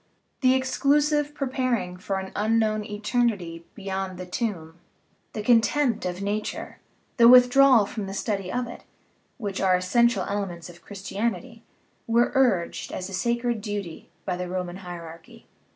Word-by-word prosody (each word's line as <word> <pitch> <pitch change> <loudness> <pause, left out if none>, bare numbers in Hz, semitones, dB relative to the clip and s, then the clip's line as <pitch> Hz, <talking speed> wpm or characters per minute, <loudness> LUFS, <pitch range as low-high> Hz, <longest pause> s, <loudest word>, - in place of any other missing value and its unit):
The 255 -1 +4
exclusive 290 +3 +1
preparing 255 -9 -1
for 190 +2 -3
an 190 0 -5
unknown 215 0 +1
eternity 205 -5 -1
beyond 190 -2 -4
the 185 - -6
tomb, 180 -5 -4 0.5
the 215 - -4
contempt 240 0 +2
of 180 +2 -4
nature, 210 +1 -4 0.4
the 235 -1 +7
withdrawal 250 -1 +7
from 205 -1 -5
the 195 - -6
study 195 -3 -2
of 250 +3 -1
it, 240 - -9 0.6
which 200 -5 -4
are 185 -1 +4
essential 205 +3 +2
elements 185 -4 -4
of 175 - -18
Christianity, 210 +3 -4 0.5
were 235 +1 +3
urged 235 -11 +1
as 185 +1 -5
a - - -9
sacred 235 +3 -1
duty 205 -6 -6 0.2
by 185 - -1
the 180 0 -4
Roman 180 -1 -4
hierarchy. 170 -3 -10
205 Hz, 140 wpm, -25 LUFS, 185-240 Hz, 0.6 s, the